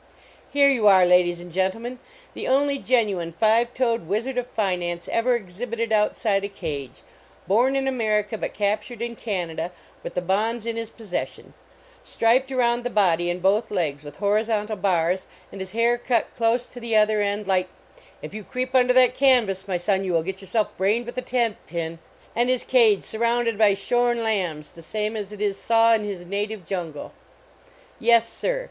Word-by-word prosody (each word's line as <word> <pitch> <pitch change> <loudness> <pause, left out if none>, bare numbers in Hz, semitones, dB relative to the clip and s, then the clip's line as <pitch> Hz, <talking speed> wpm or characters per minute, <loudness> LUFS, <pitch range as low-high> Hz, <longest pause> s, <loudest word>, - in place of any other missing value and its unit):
Here 285 0 +5
you 230 -6 +2
are, 190 -2 +7
ladies 175 -1 +3
and 175 0 -11
gentlemen, 225 +8 -2 0.3
the - - -5
only 280 +1 +2
genuine 200 -11 0
five 225 +5 +2
toed 235 -8 0
Wizard 230 +8 -2
of 250 0 -2
Finance 180 -6 -2
ever 245 +2 +2
exhibited 230 +3 -4
outside 210 -1 +1
a - - -1
cage, 145 -9 -6 0.4
born 240 +8 +3
in 270 0 0
Amer 220 -5 +1
ica, 210 +1 -7
but - - -3
captured 210 +3 -2
in 235 0 -4
Canada 175 -6 -3 0.3
with - - -7
the 180 - 0
bonds 215 +5 0
in 230 -1 -2
his 230 -1 -4
possession, 215 -6 -6 0.5
striped 255 +4 +1
around 240 -2 +1
the 245 - -2
body 175 -6 +2
and 175 +1 -3
both 210 +4 +2
legs 155 -7 -2
with 145 -1 -10
horizontal 210 +2 0
bars, 185 -2 0 0.2
and 195 - -8
his 190 0 -7
hair 235 +1 +2
cut 240 -2 0
close 235 +1 +1
to 245 - -11
the 230 -2 -2
other 215 0 +4
end 205 +1 -1
like 185 -1 +1 0.5
if 155 - -7
you 215 0 -6
creep 255 +6 -4
under 250 -1 +4
that 250 -1 +5
canvas, 235 -8 +2
my 185 -2 0
son, 190 +2 0
you 185 -2 -2
will 165 -1 +2
get 190 +2 -5
yourself 210 +3 -1
brained 210 +6 +1
with 240 +1 -5
a - - -3
tent 240 -3 0
pin 165 0 -4 0.4
and 240 +1 +2
his 255 -1 +1
cage 225 -6 +4
surrounded 235 0 0
by 205 -2 +4
shorn 240 +3 +1
lambs 180 -9 -2
the 165 - -14
same 215 +5 -3
as 210 -2 -5
it 210 0 -5
is 200 -1 0
saw 230 0 +4
in 220 -1 +1
his 195 -4 -5
native 205 +1 -4
jungle. 165 -6 -5 0.9
Yes, 230 -1 +4
sir! - - -2
215 Hz, 185 wpm, -24 LUFS, 190-235 Hz, 0.9 s, are